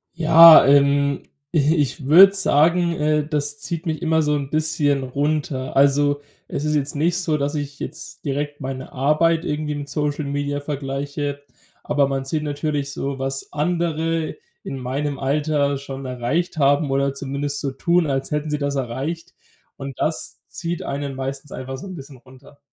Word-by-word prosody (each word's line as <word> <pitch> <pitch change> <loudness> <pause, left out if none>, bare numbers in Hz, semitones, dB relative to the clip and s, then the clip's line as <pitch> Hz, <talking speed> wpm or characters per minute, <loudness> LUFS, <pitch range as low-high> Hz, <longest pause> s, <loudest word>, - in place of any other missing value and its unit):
Ja, 165 0 +9
ähm, 140 0 +3 0.3
i 150 +2 +3
ich 145 -2 -1
würde 190 +7 +8
sagen, 175 -1 +3
äh, 150 -1 0
das 145 -1 -2
zieht 170 +1 -5
mich 155 -1 -1
immer 160 -1 +2
so 150 -1 +1
'n 140 -2 -4
bisschen 155 -3 +1
runter. 140 0 -2
Also, 145 +1 +3 0.3
es 145 - -4
ist 150 0 +1
jetzt 145 0 -1
nicht 165 +4 +1
so, 165 -5 0
dass 145 +1 -2
ich 145 -1 -5
jetzt - - -7
direkt 145 0 -3
meine 130 -1 -6
Arbeit 155 +5 +2
irgendwie 150 -1 -2
mit 145 -1 -6
Social 150 +1 -2
Media 145 0 -2
vergleiche. 145 0 -4 0.4
Aber 145 -1 +2
man 135 -1 -2
sieht 150 +3 -2
natürlich 145 -1 -2
so, 140 0 -4
was 135 0 -4
andere 165 0 -1 0.3
in 135 - -5
meinem 135 +3 -3
Alter 140 0 0
schon 135 -1 -7
erreicht 130 +8 -2
haben 140 0 +2
oder 140 0 0
zumindest 140 +1 -3
so 140 - -2
tun, 170 +5 +1
als 135 -2 -2
hätten 150 0 -2
sie 150 - -1
das 140 0 -2
erreicht. 140 +7 -4 0.4
Und 135 -2 -8
das 155 - -2
zieht 170 -1 -5
einen 140 0 -4
meistens 135 +2 -5
einfach 130 +1 -6
so 195 - -9
'n 185 - -7
bisschen 135 -2 -11
runter. 130 +3 -18
145 Hz, 170 wpm, -21 LUFS, 140-155 Hz, 0.4 s, Ja